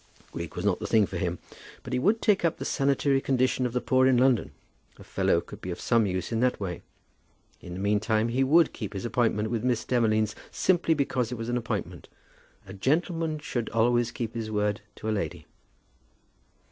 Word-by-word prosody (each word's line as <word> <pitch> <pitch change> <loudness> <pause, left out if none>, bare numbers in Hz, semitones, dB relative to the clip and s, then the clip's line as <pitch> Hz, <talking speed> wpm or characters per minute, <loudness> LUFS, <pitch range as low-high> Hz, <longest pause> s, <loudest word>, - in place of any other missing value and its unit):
Greek - - -6
was - - -4
not - - +2
the - - -4
thing 110 -2 +4
for 95 - -6
him, 85 0 -2 0.5
but 130 - -6
he 125 - +1
would 210 - +2
take 205 -4 +3
up 170 - +1
the - - -5
sanitary 140 -1 +1
condition 130 -1 +1
of - - -6
the 125 - 0
poor 130 +1 +3
in 130 -2 +4
London. 125 - +3 0.5
A - - -13
fellow - - +1
could - - -11
be 95 - -6
of 85 - -4
some 115 -3 +2
use 90 +1 -3
in 115 - 0
that 125 +1 +1
way. 90 -4 -4 0.8
In 90 - -8
the - - -6
meantime 110 +3 +1
he 130 +3 +1
would 160 +5 +4
keep 105 -3 -6
his 95 +1 -5
appointment 110 -2 0
with 115 -2 -1
Miss 125 -3 0
Demolines, 110 -3 +1 0.2
simply 175 -3 +2
because 130 -4 -1
it 125 - -4
was 115 +1 -5
an 120 - 0
appointment. 100 -8 -4 0.6
A 95 - -10
gentleman 160 - 0
should 120 -6 -3
always 120 +1 +2
keep 115 -2 -5
his 115 -2 -4
word 105 -1 0
to - - -7
a - - +1
lady! 90 -7 -3
120 Hz, 205 wpm, -27 LUFS, 105-130 Hz, 0.8 s, thing